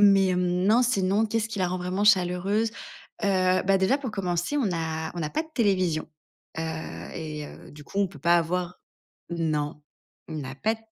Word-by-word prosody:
Hem, 205 -1 +8
mais, 195 -1 +4
hem, 180 0 +1 0.3
non, 230 +4 +5
sinon, 210 -2 +2
qu'est 225 +1 0
ce 220 - -2
qui 220 - -5
la 180 - +3
rend 185 +1 -2
vraiment 185 +3 -1
chaleureuse? 195 +3 +3 0.5
Heu, 185 -2 +3
bah 195 0 +5
déjà, 195 +9 +3
pour 260 -5 -4
commencer, 180 +5 -1
on 275 - +2
n'a 160 -2 -2
on - - -5
n'a 150 -1 -2
pas 315 - 0
de 320 - -16
télévision, 185 - +1 0.5
heu, 160 - -1 0.5
et 150 -2 -5
heu, - - -12
du 150 0 -12
coup, 200 - -5
on 200 - +3
peut 190 - -13
pas 170 +1 +5
avoir 180 +2 -2 0.5
non, 150 -3 -1 0.5
on 155 -2 -4
a 130 - -6
pas 220 +7 +1
d 225 - -15
185 Hz, 210 wpm, -26 LUFS, 165-205 Hz, 0.5 s, Hem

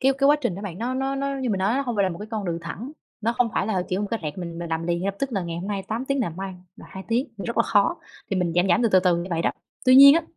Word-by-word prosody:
cái 270 +1 +4
cái 275 - +4
quá 295 - +6
trình 240 -9 -1
đó 200 - -7
bạn, 185 -2 -6
nó 245 +3 -2
nó 270 +1 -1
nó 275 0 -2
như 255 - -1
mình 195 - 0
nói 195 +5 +1
nó - - +1
hông 240 -4 -3
phải 200 - +3
là 190 - +2
một 170 0 -6
cái 210 - -7
con 215 -3 -3
đường 170 -2 -2
thẳng, 220 - -7 0.3
nó 230 +2 +1
không 245 -2 +3
phải 190 - +1
là, 190 -5 0
kiểu, 185 +2 -1
một 205 - -1
cái 230 - -2
rẹt, 150 +2 -5
mình 170 -2 -6
mình 170 -1 -5
làm 160 +1 -2
liền 170 0 0
ngay 195 - -1
lập 200 - -1
tức 270 -3 -2
là 195 -3 -1
ngày 170 -1 -4
hôm 190 +4 -5
nay 200 -2 -2
8 230 +4 -2
tiếng 275 0 0
nè, 215 - 0
mai 190 0 -5 0.2
là - - -13
2 190 - -8
tiếng, 240 +4 +1 0.2
rất 235 - -4
là 230 - +5
khó, 205 -3 +3 0.4
thì 195 - 0
mình 180 -2 0
giảm, 175 +2 +3
giảm 225 +8 +3
từ 230 - +4
từ 190 -3 +5
từ 180 -2 +3
như 170 +1 -3
vậy 165 -1 0
đó. - - +2 0.3
Tuy 255 - +6
nhiên 280 +2 +10
á, 335 - +2
200 Hz, 365 wpm, -24 LUFS, 180-245 Hz, 0.4 s, nhiên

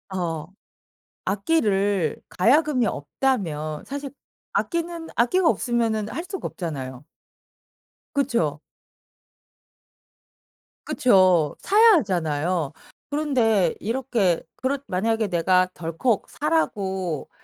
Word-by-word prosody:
어. 165 -4 -3 0.8
악기를 200 - +1
가야금이 260 - +3
없다면 155 - -2
사실 280 0 -6 0.4
악기는 335 -1 -2
악기가 325 +9 +3
없으면은 225 -3 0
할 335 - -4
수가 385 -1 -4
없잖아요. 135 -6 -6 1.1
그쵸. 235 - 0 2.3
그쵸. 185 - +4
사야 440 +3 +6
하잖아요. 170 - -1 0.4
그런데 240 - +2
이렇게 225 -6 0
그렇 270 +2 -1
만약에 220 +3 0
내가 185 +1 +3
덜컥 175 +7 -1
사라고 190 - -1
205 Hz, 200 characters per minute, -24 LUFS, 170-270 Hz, 2.3 s, 사야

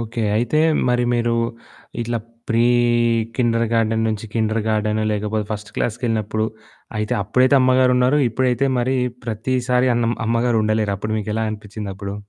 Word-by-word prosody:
Okay. 115 0 -4
అయితే 120 +7 +1 0.3
మరి 125 0 +2
మీరు 120 0 +1 0.7
ఇట్లా 120 0 -2 0.3
ప్రీ 115 +1 +3 0.7
కిండర్‌గార్టెన్ 115 -2 +1
నుంచి 110 0 -3
కిండర్‌గార్టెన్ 110 -1 0
లేకపోతే 105 +1 -2
ఫస్ట్ 105 0 -6
క్లాస్‌కెళ్ళినప్పుడు 110 -2 -1 0.5
అయితే 105 0 -1
అప్పుడైతే 130 +7 +3
అమ్మగారున్నారు. 130 +1 +3
ఇప్పుడైతే 130 +3 +1
మరి 130 +2 +1 0.3
ప్రతిసారి 125 +3 0
అన్ 120 0 +1 0.2
అమ్మగారుండలేరు. 110 -3 +1
అప్పుడు 105 +2 -3
మీకెలా 110 +1 -2
అనిపిచ్చిందప్పుడు? 100 -2 -6
115 Hz, 110 wpm, -20 LUFS, 110-125 Hz, 0.7 s, ప్రీ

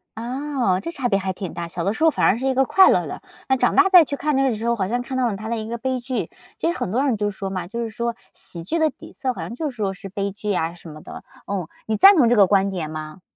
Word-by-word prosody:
嗯， 260 +4 -3
啊， - - -1
这 335 - -5
差 270 -6 -2
别 195 - +3
还 190 0 -2
挺 185 -2 -6
大。 170 0 -5
小 170 0 -5
的 200 - 0
时 315 - -3
候 320 - +7
反 - - +1
而 215 - +4
是 265 +2 -2
一 265 - +2
个 265 +1 +3
快 380 +9 +6
乐 - - +2
的， - - -7 0.3
那 265 - +4
长 245 -1 +1
大 385 0 +6
再 360 -3 +9
去 285 - -4
看 300 -1 0
那 270 - +3
个 265 - +3
的 225 - -1
时 225 +2 -5
候， 235 - +2
好 190 -4 -1
像 245 +3 -1
看 260 +1 -5
到 250 -2 +2
了 200 - -4
他 220 +1 -7
的 235 - -1
一 215 0 -5
个 235 - -3
悲 260 +1 -2
剧。 250 +1 -3 0.3
其 - - -1
实 - - -5
很 185 - -3
多 255 +5 +1
人 260 -5 +2
就 205 0 -1
说 195 0 -5
嘛， 185 -2 -4
就 235 +4 -4
是 225 - -4
说 235 +1 -3 0.2
喜 170 -2 -6
剧 330 - -2
的 315 -1 +3
底 - - -14
色 260 -2 -2
好 - - -7
像 235 - -6
就 300 0 -3
说 205 -5 -2
是 195 +1 -10
悲 200 +1 -3
剧 210 +1 -6
呀 165 -2 -1
什 170 -1 -12
么 155 0 -11
的， - - -10 0.2
嗯， 190 -5 -3 0.2
你 220 - 0
赞 395 - +8
同 245 -6 +5
这 245 - +4
个 200 -2 +7
观 195 0 +3
点 170 -5 -4
吗？ 155 +3 -7
230 Hz, 350 characters per minute, -22 LUFS, 195-265 Hz, 0.3 s, 再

